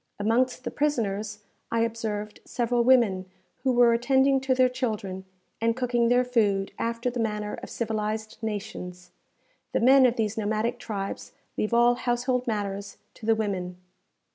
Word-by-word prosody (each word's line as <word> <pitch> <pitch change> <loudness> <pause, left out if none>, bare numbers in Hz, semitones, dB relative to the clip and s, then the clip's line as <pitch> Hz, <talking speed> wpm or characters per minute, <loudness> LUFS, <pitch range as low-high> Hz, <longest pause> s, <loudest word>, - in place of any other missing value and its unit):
Amongst 245 +4 +1
the - - -4
prisoners 210 -7 -1 0.3
I 230 - +1
observed 220 -2 -3
several 240 0 0
women, 220 -7 +3 0.3
who 260 +1 +1
were 240 -1 +5
attending 265 +3 +3
to 265 -1 +1
their 255 0 +5
children, 210 -7 -3 0.4
and 230 0 +2
cooking 245 -2 +1
their 245 +1 +4
food, 205 -6 +1
after 230 +2 -1
the 245 - -4
manner 210 -2 -2
of - - -8
civilized 220 -1 -3
nations. 180 -4 -6 0.6
The - - +2
men 260 +2 +7
of 240 - 0
these 220 -1 -1
nomadic 220 +3 -1
tribes 200 -4 -5 0.2
leave 215 - -1
all 240 +1 +5
household 245 +1 -1
matters 200 -2 -3 0.2
to 220 - -10
the 225 - +5
women. 185 -5 -3
230 Hz, 150 wpm, -26 LUFS, 210-245 Hz, 0.6 s, men